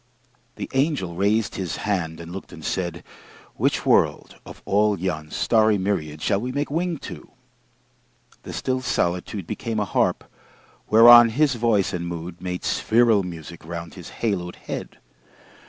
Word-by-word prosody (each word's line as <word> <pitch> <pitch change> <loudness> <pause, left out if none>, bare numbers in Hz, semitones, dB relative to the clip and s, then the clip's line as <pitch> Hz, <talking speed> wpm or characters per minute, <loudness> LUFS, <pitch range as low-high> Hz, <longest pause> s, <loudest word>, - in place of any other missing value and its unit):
The - - -5
angel 135 - 0
raised 100 +4 +1
his 90 -3 -3
hand 85 -6 -1
and 85 0 -9
looked 95 +2 -8
and 80 - -10
said, 85 -3 -3 0.5
"Which - - 0
world, - - +2
of - - -12
all 105 +1 +2
yon 80 -4 -3
starry 110 +2 +2
myriad 80 -6 -2
Shall 100 -1 +1
we 125 +2 -3
make 145 +2 -2
wing 170 +1 -1
to?" - - -9 1.1
The - - -9
still 130 0 -2
solitude 90 -5 -1
Became 115 +4 -3
a 105 - 0
harp 95 - 0 0.7
whereon 120 +1 +9
his 140 +4 +2
voice 115 -5 +1
and 85 -1 -3
mood 85 +1 -7
Made 90 -1 -4
spheral 115 -2 +3
music 85 -3 -8
round 85 0 -7
his 90 -3 -10
haloed 90 -6 -1
head. - - -7
100 Hz, 150 wpm, -23 LUFS, 85-115 Hz, 1.1 s, whereon